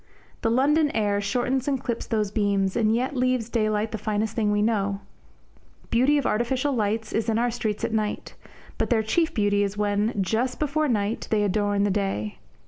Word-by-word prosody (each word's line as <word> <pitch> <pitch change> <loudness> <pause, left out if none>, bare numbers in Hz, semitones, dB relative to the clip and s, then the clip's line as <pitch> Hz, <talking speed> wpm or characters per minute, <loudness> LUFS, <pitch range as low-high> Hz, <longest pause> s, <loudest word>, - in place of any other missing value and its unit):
The 225 - +1
London 290 +6 +3
air 205 -2 +1
shortens 250 +5 -1
and 275 -2 +1
clips 235 -1 -4
those 215 -3 0
beams, 200 -3 +1
and 220 -1 +2
yet 255 +4 -1
leaves 255 -2 0
daylight 215 -2 0
the 220 - -4
finest 215 +1 -2
thing 215 -3 +1
we 205 0 +2
know. 200 -3 0 0.9
Beauty 260 +5 +4
of 285 - -1
artificial 255 +5 0
lights 220 -1 -1
is 225 +1 0
in 220 - +1
our 240 +1 +1
streets 220 -3 -3
at - - -3
night, 215 -1 -2 0.5
but - - 0
their 225 -3 +2
chief 320 +10 +1
beauty 205 -2 +1
is 200 0 -1
when, 205 +1 0
just 230 +6 0
before 305 +1 0
night, 215 -3 -1
they 210 -1 +2
adorn 205 0 +1
the 205 - +2
day. 185 - -2
220 Hz, 190 wpm, -25 LUFS, 205-245 Hz, 0.9 s, Beauty